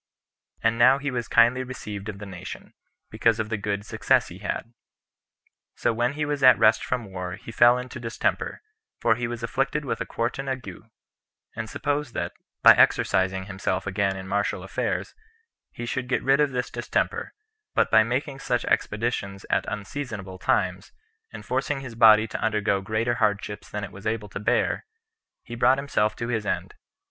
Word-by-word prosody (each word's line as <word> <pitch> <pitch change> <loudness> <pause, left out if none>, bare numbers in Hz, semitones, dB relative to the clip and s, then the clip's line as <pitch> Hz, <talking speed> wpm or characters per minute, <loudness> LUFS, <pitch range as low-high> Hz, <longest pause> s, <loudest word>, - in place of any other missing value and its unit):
And 115 +1 +2
now 130 +3 +7
he 140 0 -3
was 120 -3 -3
kindly 120 +2 +4
received 105 -5 -7
of 100 - -6
the 105 - -8
nation, 95 -3 -9 0.4
because 115 -1 +2
of 110 -1 -2
the 110 - 0
good 100 0 -3
success - - +2
he - - -10
had. 115 - -4 1.0
So 120 - +1
when 120 +3 0
he 150 +1 -2
was 145 -1 -2
at 130 -1 +8
rest 110 0 +4
from 120 -6 -3
war, 90 -1 -5
he 115 - -10
fell 120 +2 +6
into 125 0 -6
a - - -11
distemper; 115 -1 -2 0.4
for 115 - +4
he 120 +1 -2
was 120 0 -6
afflicted 135 +5 -1
with - - -3
a - - -3
quartan 130 +4 -2
ague, 115 -5 -6 0.7
and 110 0 -5
supposed 145 -1 -2
that, 85 - -2 0.3
by - - +11
exercising 95 0 +3
himself 95 -1 -2
again 95 0 0
in 95 0 -7
martial 100 +1 -1
affairs, - - -2 0.6
he 120 - -6
should 125 +1 -3
get - - 0
rid 135 +2 +4
of 150 -1 +4
this 125 -1 -3
distemper; - - -2 0.4
but - - +2
by 110 - +7
making 130 +4 -2
such 125 -2 -1
expeditions 100 -3 -1
at - - +2
unseasonable 105 -4 -6
times, - - 0 0.4
and - - -9
forcing 145 -2 -1
his 130 -4 -8
body 110 -1 +6
to - - -5
undergo 105 -3 +1
greater 110 +4 0
hardships 105 -1 -1
than 105 0 -4
it 100 - -6
was 100 +2 -7
able 110 -1 -2
to 100 - -6
bear, 105 - +1 0.6
he 120 - -10
brought 120 +3 +4
himself 110 -6 0
to 115 - -4
his 110 -3 -1
end. 105 - -2
115 Hz, 180 wpm, -25 LUFS, 100-125 Hz, 1.0 s, by